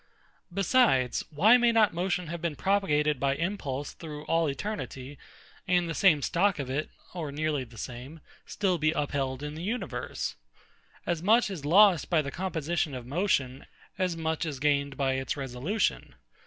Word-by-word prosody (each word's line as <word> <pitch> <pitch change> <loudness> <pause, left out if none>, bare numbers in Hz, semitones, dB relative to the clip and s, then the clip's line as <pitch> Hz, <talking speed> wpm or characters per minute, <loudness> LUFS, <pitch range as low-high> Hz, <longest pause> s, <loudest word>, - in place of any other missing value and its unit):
Besides, 195 - +2
why 205 +11 +6
may 240 -1 +4
not 220 -4 +4
motion 180 +1 -1
have 170 +1 -6
been 170 -3 -2
propagated 150 -7 +1
by 140 0 +1
impulse 145 -6 -3
through 150 -2 -8
all 165 -2 +1
eternity, 140 -5 -5 0.5
and 175 -1 +2
the 165 - -3
same 160 -6 +4
stock 195 +3 +2
of 135 -3 -4
it, 150 +3 -2 0.2
or 160 -5 -4
nearly 150 -1 -1
the 115 -1 -16
same, 125 +6 -7
be 160 - -16 0.3
still 185 -4 0 0.2
upheld 140 -2 -2
in 150 0 -5
the 160 - -7
universe? 225 +7 -4 0.7
As 170 -2 -1
much 215 +3 +3
is 160 -7 -6
lost 185 +1 +5
by 160 -3 +3
the 140 - -5
composition 165 -4 -2
of 125 -2 -7
motion, 135 -4 -1 0.3
as 180 -3 0
much 160 0 -1
is 150 -5 -4
gained 140 -1 +1
by 135 -1 +1
its 130 +2 -2
resolution. 135 - -2
155 Hz, 165 wpm, -28 LUFS, 140-185 Hz, 0.7 s, why